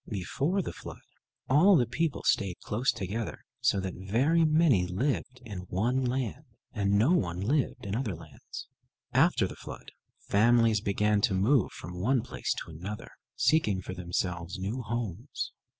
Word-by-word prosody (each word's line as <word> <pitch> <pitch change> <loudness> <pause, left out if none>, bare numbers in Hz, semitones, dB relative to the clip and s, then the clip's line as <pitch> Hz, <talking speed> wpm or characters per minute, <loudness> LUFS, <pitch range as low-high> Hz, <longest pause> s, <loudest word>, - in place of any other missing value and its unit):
Before 140 - -1
the - - -5
flood, - - -9 0.5
all 175 +9 +6
the 125 - +4
people 140 +5 -1
stayed 95 -3 +1
close 120 +6 +1
together, 105 +4 -4
so 100 - +2
that 95 -1 -4
very 125 - +2
many 155 - +4
lived 130 +6 -2
in 95 -4 -7
one 120 +8 +1
land, 130 +2 -2 0.3
and 100 -2 +2
no 115 +10 +4
one 90 - +1
lived 130 +6 0
in 100 +1 -2
other 115 -6 -2
lands. 80 -1 -10 0.5
After - - +4
the - - -6
flood - - -10 0.3
families 115 0 +3
began 105 +1 +1
to 105 -3 +2
move 110 +4 +3
from 90 +1 -7
one 125 +3 +2
place - - -2
to - - -11
another, 95 +7 -7 0.2
seeking 110 -12 +2
for 95 - -6
themselves 90 0 -3
new 100 +7 -3
homes. 115 - -4
110 Hz, 155 wpm, -29 LUFS, 95-130 Hz, 0.5 s, all